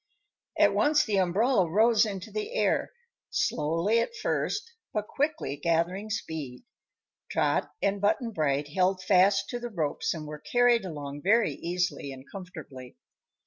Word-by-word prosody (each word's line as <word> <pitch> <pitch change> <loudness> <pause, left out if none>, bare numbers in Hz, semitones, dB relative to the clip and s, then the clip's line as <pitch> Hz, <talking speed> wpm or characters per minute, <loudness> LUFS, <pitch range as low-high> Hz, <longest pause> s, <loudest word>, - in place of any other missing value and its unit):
At - - +5
once 295 0 +3
the 210 -3 0
umbrella 190 +1 +2
rose 220 +4 +4
into 195 -3 -6
the 430 +3 -4
air; - - +1 0.4
slowly, 175 - +1
at 470 - -2
first, 460 -1 -2 0.2
but 210 -1 -2
quickly 290 - -1
gathering 170 +6 0
speed. 155 - -5 0.7
Trot - - +1
and 200 0 +1
Button 220 +3 +1
Bright 145 -5 0
held 185 +3 +1
fast 195 +1 +4
to 245 - -3
the 240 0 -5
ropes 160 -9 -1
and 155 -1 -6
were 150 0 -7
carried 240 +2 +3
along 145 -4 -6
very 220 +6 +3
easily 175 -4 -2
and 135 0 -10
comfortably. 155 -10 -10
190 Hz, 145 wpm, -28 LUFS, 160-230 Hz, 0.7 s, At